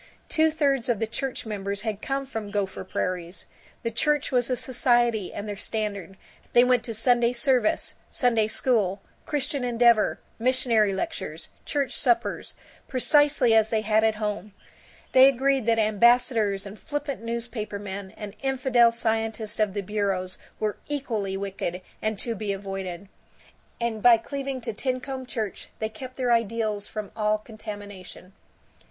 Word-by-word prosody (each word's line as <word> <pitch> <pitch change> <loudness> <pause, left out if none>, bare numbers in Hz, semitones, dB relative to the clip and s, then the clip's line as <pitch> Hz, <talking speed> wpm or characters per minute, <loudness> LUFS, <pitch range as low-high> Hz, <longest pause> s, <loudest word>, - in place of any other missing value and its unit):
Two 320 0 +4
thirds 280 -5 +1
of 240 - +2
the 225 - 0
church 245 +4 -4
members 200 -1 -3
had 215 -2 -3
come 275 0 -2
from 225 -6 -5
Gopher 200 -2 -2
Prairies. 180 -1 -3 0.4
The 230 - -1
church 295 +6 +1
was 245 -2 +2
their 255 - 0
society 240 -5 +1
and 205 - -6
their 205 - -3
standard; 200 -2 -4 0.4
they 240 - +7
went 250 -2 +3
to 230 -3 -4
Sunday 240 +1 +3
service, 245 -2 +2 0.2
Sunday 230 -4 +2
School, 215 -5 +2 0.3
Christian 285 -3 -1
Endeavor, 235 -2 +3 0.2
missionary 230 -4 +3
lectures, 160 -4 -4 0.2
church 280 -2 -1
suppers, 240 -4 +1 0.3
precisely 280 -2 +4
as 220 -1 +5
they 220 -1 +1
had 215 0 +2
at 220 -1 +3
home; 210 -1 -3 0.6
they 260 +1 +8
agreed 270 -2 +2
that 230 -1 +4
ambassadors 220 -2 +3
and 200 +2 -9
flippant 290 -3 -4
newspapermen 210 -4 -4
and 210 -2 -7
infidel 255 -3 +4
scientists 225 -2 -2
of 210 -2 +1
the 205 - 0
bureaus 195 -2 -2 0.2
were 215 -1 -1
equally 225 -10 -2
wicked 195 -2 -3 0.2
and 215 -1 -1
to 230 +3 -2
be 210 -2 -3
avoided; 195 -1 -5 0.7
and 235 -2 -2
by 240 0 +8
cleaving 275 +2 -4
to 230 -1 -4
Tincomb 255 +2 -3
Church 215 -3 -4
they 220 - -2
kept 255 +3 -9
their 250 -2 +2
ideals 220 -2 0
from 215 -2 -6
all 215 -1 +2
contamination. 205 -4 -10
225 Hz, 145 wpm, -26 LUFS, 205-250 Hz, 0.7 s, they